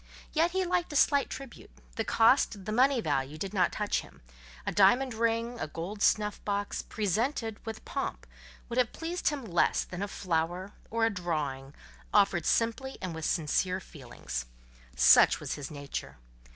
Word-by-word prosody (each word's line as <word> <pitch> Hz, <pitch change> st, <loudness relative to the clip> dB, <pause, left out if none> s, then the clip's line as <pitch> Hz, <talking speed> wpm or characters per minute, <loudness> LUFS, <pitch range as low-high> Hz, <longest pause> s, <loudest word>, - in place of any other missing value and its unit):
Yet 330 Hz, +2 st, +3 dB
he 375 Hz, +1 st, 0 dB
liked 355 Hz, -1 st, 0 dB
a -, -, -6 dB
slight 280 Hz, 0 st, +4 dB
tribute; 270 Hz, -3 st, -9 dB, 0.3 s
the 225 Hz, -, -1 dB
cost, 225 Hz, -4 st, +3 dB
the 215 Hz, -, -3 dB
money 255 Hz, +2 st, +3 dB
value, 145 Hz, -3 st, -1 dB
did 195 Hz, +4 st, -5 dB
not 190 Hz, -, +2 dB
touch 210 Hz, -1 st, 0 dB
him: -, -, -17 dB, 0.4 s
a -, -, -1 dB
diamond 240 Hz, +6 st, +4 dB
ring, 230 Hz, +1 st, 0 dB
a -, -, -2 dB
gold 180 Hz, +7 st, -6 dB
snuff 210 Hz, -1 st, +2 dB
box, 205 Hz, 0 st, -2 dB
presented, 225 Hz, -, -2 dB
with 220 Hz, 0 st, -6 dB
pomp, -, -, -4 dB, 0.4 s
would 240 Hz, +1 st, -1 dB
have 245 Hz, -3 st, +1 dB
pleased 340 Hz, +2 st, -3 dB
him 285 Hz, -5 st, -5 dB
less 175 Hz, -5 st, +2 dB
than 180 Hz, +1 st, -7 dB
a 205 Hz, -, -1 dB
flower, 180 Hz, 0 st, -2 dB, 0.2 s
or 225 Hz, 0 st, +1 dB
a 225 Hz, -, +2 dB
drawing, 150 Hz, -7 st, -3 dB, 0.4 s
offered 195 Hz, -4 st, +3 dB
simply 235 Hz, +4 st, 0 dB
and 185 Hz, -3 st, -4 dB
with 160 Hz, -1 st, -5 dB
sincere 180 Hz, +3 st, 0 dB
feelings. 120 Hz, -, -7 dB, 0.5 s
Such -, -, +6 dB
was -, -, -4 dB
his 145 Hz, -2 st, -6 dB
nature. 140 Hz, -, -6 dB
205 Hz, 165 wpm, -30 LUFS, 170-240 Hz, 0.5 s, Such